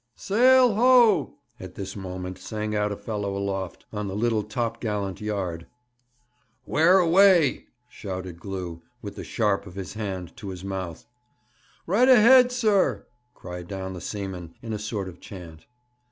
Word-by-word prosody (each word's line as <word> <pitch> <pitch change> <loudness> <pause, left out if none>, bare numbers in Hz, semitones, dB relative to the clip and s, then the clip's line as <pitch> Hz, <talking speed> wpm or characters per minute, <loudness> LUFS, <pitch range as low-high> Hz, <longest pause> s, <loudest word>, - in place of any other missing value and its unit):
'Sail 250 +3 +4
ho!' 230 - +4 0.2
at - - -10
this 100 0 -6
moment 95 -1 -6
sang 105 -1 -4
out 105 0 0
a 100 - -4
fellow 100 -2 -4
aloft, 95 -2 -4
on 105 -1 -3
the 95 - -5
little 110 0 +1
top 115 +2 -3
gallant 105 -4 -3
yard. 95 -6 -3 1.0
'Where 170 +5 +4
away?' 180 -4 +4 0.2
shouted 95 -7 -7
Glew, 90 -4 -6 0.2
with - - -7
the - - -7
sharp 105 -2 0
of 90 - -11
his 95 -1 -6
hand 95 -5 -5
to 105 -5 -7
his 95 -1 -8
mouth. 95 -4 -5 0.8
'Right 230 +9 +3
ahead, 250 +1 +7
sir!' 215 -6 +1 0.3
cried 90 -1 -8
down 95 -1 -5
the 90 - -8
seaman, 95 -4 -6
in 115 -1 -4
a 105 - -3
sort 105 -2 -4
of 90 - -10
chant. 85 -5 -11
105 Hz, 155 wpm, -25 LUFS, 95-155 Hz, 1.0 s, ahead